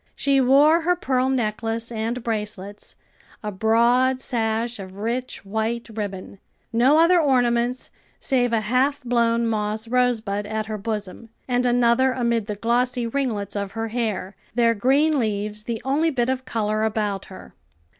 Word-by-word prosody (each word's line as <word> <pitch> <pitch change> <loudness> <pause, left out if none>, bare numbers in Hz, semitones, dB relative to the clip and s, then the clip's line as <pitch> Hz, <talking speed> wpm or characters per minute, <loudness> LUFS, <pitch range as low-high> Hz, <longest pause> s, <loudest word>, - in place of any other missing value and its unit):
She 275 -1 +2
wore 290 +6 +5
her 355 +2 +2
pearl 260 -6 0
necklace 230 -2 -2
and 230 +2 -3
bracelets, 210 -3 -5 0.5
a 210 - -3
broad 235 +5 +3
sash 230 -2 -2
of 190 0 -9
rich 235 +2 -3
white 220 +3 -2
ribbon; 200 -2 -6 0.3
no 255 +6 +4
other 340 +2 +5
ornaments 245 -3 +1 0.3
save 245 -3 +1
a 225 -2 +1
half 255 +6 +1
blown 235 -1 +1
moss 215 0 -2
rosebud 225 -4 0
at 215 0 -3
her 215 -1 -5
bosom, 215 +1 -5 0.2
and 250 0 +1
another 245 +2 +3
amid 235 -4 0
the 210 - -3
glossy 245 +3 0
ringlets 225 -6 -2
of 200 -1 -3
her 225 0 -3
hair, 215 -4 -3 0.2
their 235 -1 +4
green 275 +7 +2
leaves 210 -1 -2
the 230 -2 -3
only 295 +5 +2
bit 250 -5 0
of 260 0 -2
color 215 -3 -1
about 210 -3 -1
her. 190 - -12
230 Hz, 150 wpm, -23 LUFS, 215-255 Hz, 0.5 s, wore